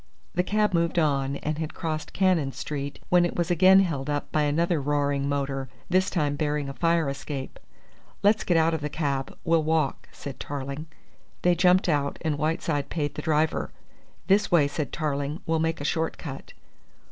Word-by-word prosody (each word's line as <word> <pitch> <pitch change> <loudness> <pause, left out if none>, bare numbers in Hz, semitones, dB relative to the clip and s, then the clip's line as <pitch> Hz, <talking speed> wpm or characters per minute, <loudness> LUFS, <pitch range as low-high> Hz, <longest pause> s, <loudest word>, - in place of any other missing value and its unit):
The 180 - +2
cab 210 +2 +1
moved 170 0 +1
on, 140 -4 +1
and 150 +2 -3
had 160 -1 -4
crossed 155 -3 -3
Cannon 175 -8 +2
Street, 140 -1 -5
when 180 -1 +5
it 175 - -1
was 175 0 0
again 190 +3 +7
held 150 -7 -2
up 145 0 -2
by 155 - +2
another 160 +2 +1
roaring 140 0 0
motor, 135 -2 -2 0.2
this 185 +2 +3
time 150 -5 0
bearing 150 -1 -1
a 135 - -5
fire 165 +1 +2
escape. 135 0 -5 0.6
"Let's 210 +2 +4
get 175 - +2
out 165 +1 +3
of 160 - -2
the 150 - -2
cab; 140 -3 -2
we'll 165 0 +3
walk," 155 -3 0
said 140 -2 -8
Tarling. 140 +2 -5 0.6
They 180 - +5
jumped 180 +2 +4
out, 145 -4 0
and 150 -3 -1
Whiteside 155 -2 -1
paid 150 -3 -2
the - - -5
driver. 155 -1 +1 0.6
"This 200 +2 +3
way," 160 -5 +5
said 145 +1 -3
Tarling. 145 0 -2
"We'll 160 0 +1
make 160 +1 0
a 145 - -4
short 160 +1 -1
cut." 135 -4 -8
155 Hz, 180 wpm, -26 LUFS, 145-170 Hz, 0.6 s, again